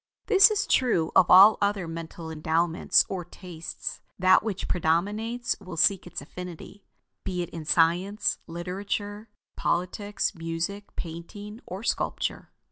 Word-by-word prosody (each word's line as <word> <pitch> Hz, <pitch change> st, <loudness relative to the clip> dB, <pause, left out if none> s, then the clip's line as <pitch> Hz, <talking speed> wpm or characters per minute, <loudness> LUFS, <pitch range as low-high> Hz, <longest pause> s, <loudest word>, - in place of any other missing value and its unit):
This 395 Hz, -1 st, +7 dB
is 415 Hz, -1 st, 0 dB
true 200 Hz, -11 st, +2 dB
of 180 Hz, -, +5 dB
all 200 Hz, +4 st, +8 dB
other 200 Hz, -3 st, 0 dB
mental 165 Hz, 0 st, -7 dB
endowments 160 Hz, +2 st, +2 dB
or 185 Hz, -2 st, -4 dB
tastes; 170 Hz, -1 st, -8 dB, 0.2 s
that 185 Hz, 0 st, +5 dB
which 210 Hz, -3 st, -4 dB
predominates 205 Hz, +9 st, 0 dB
will 185 Hz, -4 st, -9 dB
seek 190 Hz, +2 st, +2 dB
its 175 Hz, -, -7 dB
affinity; 180 Hz, +5 st, -10 dB, 0.4 s
be 180 Hz, -2 st, -2 dB
it -, -, -9 dB
in 165 Hz, -2 st, -7 dB
science, 175 Hz, +6 st, +1 dB
literature, 200 Hz, +5 st, -5 dB, 0.3 s
politics, 195 Hz, +4 st, -1 dB
music, 165 Hz, +5 st, -5 dB
painting, 205 Hz, +7 st, -8 dB
or 190 Hz, +4 st, -7 dB
sculpture. -, -, -2 dB
180 Hz, 125 wpm, -26 LUFS, 165-205 Hz, 0.4 s, all